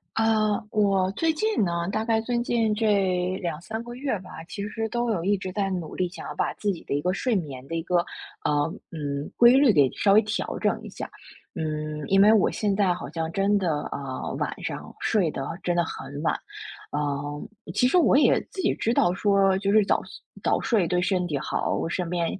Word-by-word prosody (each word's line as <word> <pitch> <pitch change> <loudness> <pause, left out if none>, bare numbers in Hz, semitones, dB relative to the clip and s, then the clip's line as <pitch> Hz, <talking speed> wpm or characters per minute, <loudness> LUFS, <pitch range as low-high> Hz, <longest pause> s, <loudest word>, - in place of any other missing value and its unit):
呃， 220 -1 +2
我 195 -3 +2
最 320 +10 +1
近 430 - +1
呢， 170 -1 -1
大 215 +2 -1
概 225 -1 +2
最 240 +2 -1
近 230 -3 +1
这 190 -4 +1
2-3 175 +5 -4
个 240 0 -8
月 260 -4 -2
吧， 180 -3 -10
其 205 0 -5
实 225 +1 -3
都 240 0 0
有 180 -6 -1
一 200 +1 +2
直 190 -1 -5
在 195 0 -1
努 175 -4 -4
力， 185 - 0
想 185 - -8
要 - - -5
把 - - -1
自 205 - -1
己 180 - -5
的 - - -6
一 140 - +1
个 180 +4 0
睡 250 +3 0
眠 140 -9 -4
的 165 - -5
一 165 - -1
个， 180 +2 0 0.5
呃， 145 +1 +1 0.2
嗯， 145 -2 -4
规 240 +1 +8
律 270 -4 +6
给 140 -7 +4
稍 200 - +2
微 210 - +8
调 215 0 -3
整 - - +1
一 - - -8
下。 - - -7 0.4
嗯， 155 -1 -3
因 195 0 +5
为 210 +2 +7
我 215 -3 +4
现 205 -2 0
在 195 -3 +2
好 175 - -7
像 160 0 -3
真 195 +4 +2
的 160 -6 0
啊， 135 -2 -5
晚 - - -1
上 - - -5
睡 195 -8 +2
得 135 -2 -4 0.2
真 175 -1 0
的 175 - +3
很 145 -2 -7
晚。 160 - +2 0.6
嗯， 145 0 -3 0.3
其 250 - +3
实 310 +8 +4
我 320 - +5
也 295 - +4
自 385 -4 -5
己 355 - +2
知 230 - 0
道 175 - +3
说 195 0 +3
就 200 0 0
是 210 0 +5
早 - - +2 0.4
早 - - +2
睡 205 -8 +2
对 180 +1 +1
身 180 -1 +1
体 150 -5 -1
好， 145 - -1
我 - - -1
身 180 0 -2
边 170 -1 0
195 Hz, 235 characters per minute, -25 LUFS, 165-220 Hz, 0.6 s, 规